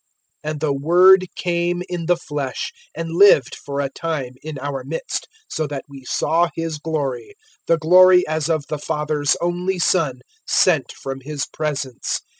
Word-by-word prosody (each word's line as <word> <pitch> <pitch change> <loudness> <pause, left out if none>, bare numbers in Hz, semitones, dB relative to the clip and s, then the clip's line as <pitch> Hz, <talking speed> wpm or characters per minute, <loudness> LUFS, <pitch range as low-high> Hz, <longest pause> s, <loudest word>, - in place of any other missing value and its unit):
001:014 155 - -2
And 155 - -5
the 150 -3 +1
Word 180 +6 +5
came 175 0 -1
in 175 -2 -4
the 175 -1 +3
flesh, 145 - -4 0.2
and 165 0 -4
lived 165 -7 +5
for 140 0 -5
a 140 - -2
time 150 -6 -4
in 155 -1 -7
our 135 -1 -4
midst, 155 +5 -4 0.2
so 155 - -2
that 140 -2 -6
we 140 -2 -12
saw 165 +6 +1
His 165 -2 -3
glory 150 - -3 0.3
the 165 - +4
glory 180 +3 +6
as 155 0 -1
of 155 -3 0
the 150 - -4
Father's 150 -1 0
only 180 +2 -1
Son, 155 -7 +1 0.3
sent 155 -9 +3
from 135 0 -6
His 145 +1 -4
presence. 145 -5 -3
155 Hz, 165 wpm, -21 LUFS, 140-175 Hz, 0.3 s, glory